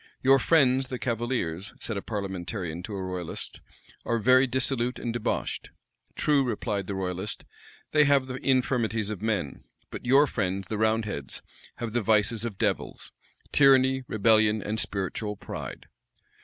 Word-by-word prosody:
"Your 135 +1 +6
friends, 135 -5 +3
the 125 - -4
cavaliers," 115 -7 -2
said 115 - -4
a 100 - -3
parliamentarian 95 -4 -4
to 100 +3 -6
a 95 - -4
royalist, 90 -2 -6 0.4
"are 115 - 0
very 130 +4 +5
dissolute 125 -1 0
and 115 - -3
debauched." 120 -2 -2 0.5
"True," 145 -2 +3
replied 105 -5 -2
the 100 - -3
royalist, 95 +2 -4 0.5
"they 150 -1 +5
have 140 -2 +4
the 130 -1 -5
infirmities 115 -5 +1
of 105 - -6
men; 105 -10 -2 0.3
but - - -7
your 135 +4 +5
friends, 95 - -2
the 110 - -2
roundheads, 110 - -1 0.3
have 115 -2 -5
the 120 - +1
vices 110 +1 +2
of 110 -5 -5
devils - - -2 0.4
tyranny, 130 -1 +5
rebellion, 110 0 +3
and 105 +2 -3
spiritual 100 +2 -3
pride." - - -7
110 Hz, 145 wpm, -27 LUFS, 100-130 Hz, 0.5 s, Your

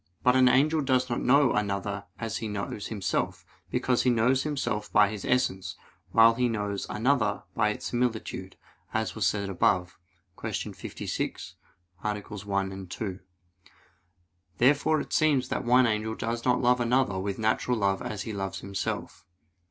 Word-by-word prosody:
But 125 0 +5
an 130 -1 +6
angel 150 +5 +3
does 130 -2 +1
not 120 - -1
know 140 +1 +4
another 100 -1 -2
as 115 -2 -3
he 110 - -4
knows 105 0 -4
himself: 95 -5 -2 0.2
because 125 -2 +1
he 125 - +2
knows 125 +3 +3
himself 130 -8 -2
by 105 -1 +5
his 105 -2 -6
essence, 110 -7 0 0.4
while 115 0 +7
he 125 +1 +1
knows 105 -3 -3
another 110 -3 +1
by 105 -2 +2
his - - -11
similitude, 110 -6 -2 0.4
as 110 0 0
was 110 - +1
said 100 -1 -1
above 90 -1 +1 0.4
(Q. - - -3
56, - - -5 0.5
AA. 105 -1 -1
1, 100 -2 -4
2). 95 +1 -5 1.4
Therefore 145 +4 +3
it - - -8
seems 145 -5 +2
that - - -2
one 125 +1 +5
angel 110 0 -1
does 115 0 -3
not 125 -1 +3
love 125 0 +3
another 120 -5 +1
with 100 0 -3
natural 125 +3 +1
love 100 -2 +1
as 100 -4 -4
he 110 - -5
loves 95 -1 -4
himself. 100 0 -4
110 Hz, 155 wpm, -28 LUFS, 100-125 Hz, 1.4 s, while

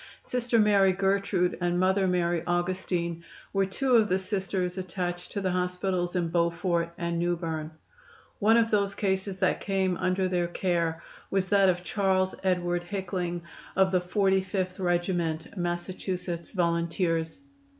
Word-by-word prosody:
Sister 245 -1 0
Mary 200 -3 +5
Gertrude 195 -1 +1
and 175 0 +1
Mother 190 +1 +3
Mary 175 -2 +1
Augustine 175 -1 -1 0.3
were 195 -1 +2
two 255 +6 +1
of 220 -3 +5
the 185 - +3
Sisters 190 -2 -2
attached 180 -1 -4
to 200 - -3
the 185 -1 0
hospitals 180 0 -1
in 175 -2 0
Beaufort 170 0 0
and 170 -1 -2
Newberne. 165 -3 -2 0.7
One 225 +2 +5
of 230 -1 +2
those 200 -2 +1
cases 190 -1 -1
that 190 -1 +1
came 190 -3 0
under 185 0 +1
their 175 -1 0
care 170 -2 -1 0.3
was 190 -1 0
that 195 -2 +5
of 175 -1 0
Charles 190 -1 +1
Edward 175 -2 +1
Hickling, 180 -3 -3 0.3
of 190 0 +4
the 185 -1 +2
Forty 190 +1 +2
fifth 185 0 -3
Regiment, 175 -2 -1
Massachusetts 175 -1 -3
Volunteers. 170 0 0
185 Hz, 140 wpm, -28 LUFS, 175-195 Hz, 0.7 s, Mary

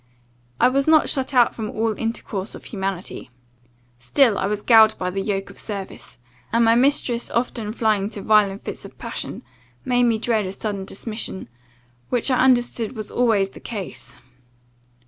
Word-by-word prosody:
I - - +6
was 275 +3 +1
not 315 -1 +5
shut 265 -1 0
out 245 -3 +4
from 220 -2 -5
all 225 0 -1
intercourse 225 -3 -4
of - - -12
humanity. 195 - -5 0.7
Still 220 - +3
I - - 0
was 210 0 -3
galled 220 -2 +6
by 180 0 -2
the 195 +1 -2
yoke 195 -1 -3
of - - -13
service, 200 -3 -7 0.3
and 230 0 +3
my 225 - +5
mistress 245 -1 +2
often 235 -3 -2
flying 215 -3 +1
into 205 -1 -6
violent 205 -2 +3
fits - - -6
of - - -12
passion, - - -6 0.4
made 245 -1 +3
me 230 -2 +2
dread 220 -3 0
a - - -4
sudden 200 -1 -4
dismission, 215 - -5 0.6
which 245 +2 +1
I 255 - +2
understood 245 -2 +2
was 215 -2 -6
always 215 -5 +2
the - - -12
case. 205 -6 -7
220 Hz, 165 wpm, -22 LUFS, 200-240 Hz, 0.7 s, I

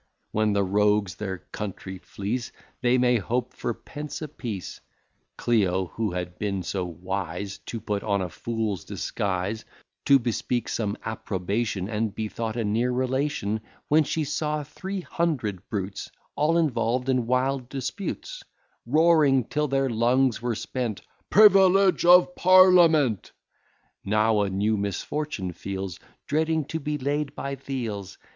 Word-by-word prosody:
When 110 -1 +1
the 100 0 +2
rogues 105 0 +2
their 95 0 -4
country 95 -2 -6
fleece, 110 +7 -4 0.3
They 125 0 +3
may 125 -1 +4
hope 120 +4 -2
for - - -3
pence 150 0 -7
a - - -3
piece. 115 -10 -6 0.6
Clio, 95 -6 +1
who 110 -2 -1
had 90 0 -5
been 100 -3 -2
so 95 +2 -2
wise 90 +2 -4
To 115 - -4
put 105 -1 -2
on 100 -1 0
a 95 - -2
fool's 110 +1 -3
disguise, 100 +2 -2 0.4
To 140 - +7
bespeak 120 0 -2
some 105 -2 -2
approbation, 100 -1 -2
And 110 -1 -2
be 110 -1 -3
thought 115 0 -4
a 115 - 0
near 115 +4 +1
relation, 130 -4 -1 0.3
When 155 +1 +5
she 155 +2 -1
saw 150 +1 -1
three 190 +7 -5
hundred 135 - -2
brutes 100 -1 -4 0.3
All 155 +3 +2
involved 125 -5 +1
in 125 -3 +1
wild 130 0 0
disputes, 145 - -5 0.5
Roaring 150 -2 +4
till 150 +6 -1
their 135 0 +1
lungs 120 +1 +2
were 120 -1 -1
spent, 120 -2 -3 0.3
PRIVILEGE 195 -3 +6
OF 180 0 +7
PARLIAMENT, 175 - +5 0.7
Now 110 +1 +2
a 100 - 0
new 105 +3 +1
misfortune 100 0 -3
feels, 95 0 -5 0.3
Dreading 160 0 +1
to 160 - -2
be 150 0 -2
laid 145 +1 -2
by 140 - -4
th' 135 0 -11
heels. 110 -8 -4
115 Hz, 140 wpm, -26 LUFS, 100-145 Hz, 0.7 s, To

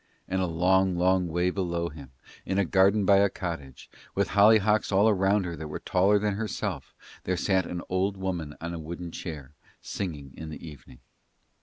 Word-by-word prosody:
And 95 0 -1
a 90 - +1
long, 90 +2 +2
long 90 0 +2
way 90 +2 0
below 85 -3 -2
him, 70 -4 -12 0.3
in 95 - -2
a 100 - +3
garden 95 +3 +3
by 100 0 +6
a 100 0 +4
cottage, 85 -9 -6 0.3
with 100 0 +1
hollyhocks 105 +1 +4
all 105 +3 +4
round 95 +1 +2
her 85 -1 -4
that 80 -1 -7
were 75 - -5
taller 95 +3 +3
than 105 0 0
herself, 105 0 -4 0.3
there 90 0 0
sat 95 -2 +1
an 90 -1 -5
old 95 +2 0
woman 90 -6 -4
on 85 +1 -5
a 85 - -5
wooden 85 +2 -7
chair, 75 -6 -7 0.3
singing 75 -9 -6
in 80 - -8
the 80 - -9
evening. 70 -4 -13
90 Hz, 185 wpm, -27 LUFS, 85-100 Hz, 0.3 s, by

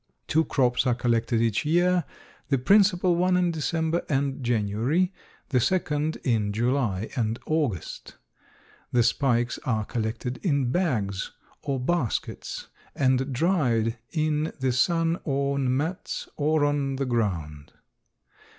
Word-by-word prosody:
Two 160 +1 +2
crops 125 -1 +1
are 125 - +3
collected 120 -1 +1
each 115 -3 +1
year, 175 +2 +2 0.4
the 140 - +3
principal 185 +4 +4
one 180 +1 +2
in 180 -1 +2
December 160 +1 -1
and 135 -2 -1
January, 120 - +1 0.4
the 130 - +2
second 150 +1 0
in 110 -5 +1
July 115 -3 0
and 115 -3 0
August. 145 - -2 0.8
The 120 -1 +3
spikes 120 -1 +1
are 110 -4 0
collected 115 +3 -3
in 140 -9 +1
bags 110 - -1 0.3
or 135 -2 -2
baskets 135 -2 -2 0.3
and 130 0 +1
dried 125 - +1
in 155 -1 0
the 130 -1 +1
sun 165 +6 +1
on 140 -2 0
mats 160 +6 -3
or 150 0 +2
on 145 -2 0
the 135 +1 -1
ground. 85 - -2
135 Hz, 125 wpm, -26 LUFS, 120-160 Hz, 0.8 s, principal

